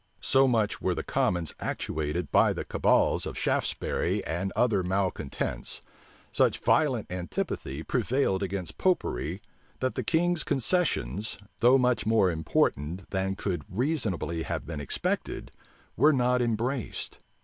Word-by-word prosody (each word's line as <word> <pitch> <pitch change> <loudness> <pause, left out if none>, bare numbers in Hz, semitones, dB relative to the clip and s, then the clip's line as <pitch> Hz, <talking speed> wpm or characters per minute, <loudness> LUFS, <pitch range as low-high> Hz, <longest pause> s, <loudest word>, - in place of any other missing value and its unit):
So 135 0 +4
much 110 -5 +1
were - - +1
the - - -3
commons 85 -3 0
actuated 80 +3 -3
by - - +5
the - - -5
cabals - - +2
of - - -6
Shaftesbury - - 0
and 90 +4 -2
other 110 -6 +3
malecontents, 90 -6 -2 0.5
such - - +3
violent 130 - +2
antipathy 85 -4 -3
prevailed 120 -4 +1
against 95 -4 -4
Popery 95 - 0 0.4
that 130 0 0
the - - -2
king's 175 0 +2
concessions, 135 - 0 0.2
though 125 +3 +6
much 125 -5 +1
more 110 -5 +4
important 80 +1 -1
than 95 0 -1
could 90 -6 -3
reasonably 105 - -1
have 80 - -3
been 80 -2 -5
expected, 70 - -2 0.4
were 150 +6 +5
not 125 -1 +2
embraced. 120 +1 -2
100 Hz, 125 wpm, -28 LUFS, 90-125 Hz, 0.5 s, though